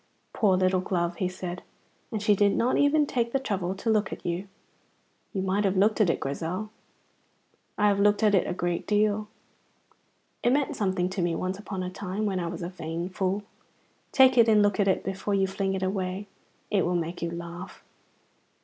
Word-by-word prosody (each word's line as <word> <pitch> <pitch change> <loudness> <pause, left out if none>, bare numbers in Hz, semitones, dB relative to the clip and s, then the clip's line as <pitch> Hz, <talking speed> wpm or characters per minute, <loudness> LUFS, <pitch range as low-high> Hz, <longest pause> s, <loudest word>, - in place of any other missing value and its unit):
"Poor 195 -5 +3
little 185 0 +2
glove," 175 -2 -1
he 185 - 0
said; 185 -1 -6 0.5
"and 215 -2 -3
she 210 -1 +4
did 200 0 +3
not 245 +2 +2
even 290 +1 +4
take 235 -4 -1
the 270 - +1
trouble 190 -7 -2
to 210 - -8
look 215 -3 +2
at - - -8
you. 175 +3 -2 0.8
You 190 -3 -2
might 195 +2 +1
have 195 -1 +1
looked 215 +3 +3
at 195 - +4
it, - - +1
Grizel. 170 +9 -3 1.1
I 210 - +4
have 200 -1 +2
looked 205 +1 +3
at 210 -1 +4
it 190 - +3
a - - -2
good 175 -1 -2
deal. 210 0 +2 1.1
It 245 - +3
meant 285 0 +1
something 190 -3 0
to 190 0 -3
me 170 -1 0
once 185 +1 -3
upon 195 -2 -5
a 180 - -4
time 195 +2 -3
when 195 -3 0
I 170 - -2
was 170 0 -5
a 170 - -3
vain 170 0 -5
fool. 190 +2 -1 0.7
Take 260 -2 +6
it 230 -1 +6
and 210 -1 +5
look 205 -1 +1
at 200 - +3
it 190 - +2
before 195 +1 -2
you 195 -1 +3
fling 195 0 -2
it 190 - -3
away. 190 +1 -2 0.5
It 200 -4 +3
will 175 +1 0
make 170 0 -3
you 170 - -1
laugh." 170 +2 -8
190 Hz, 205 wpm, -27 LUFS, 180-210 Hz, 1.1 s, Take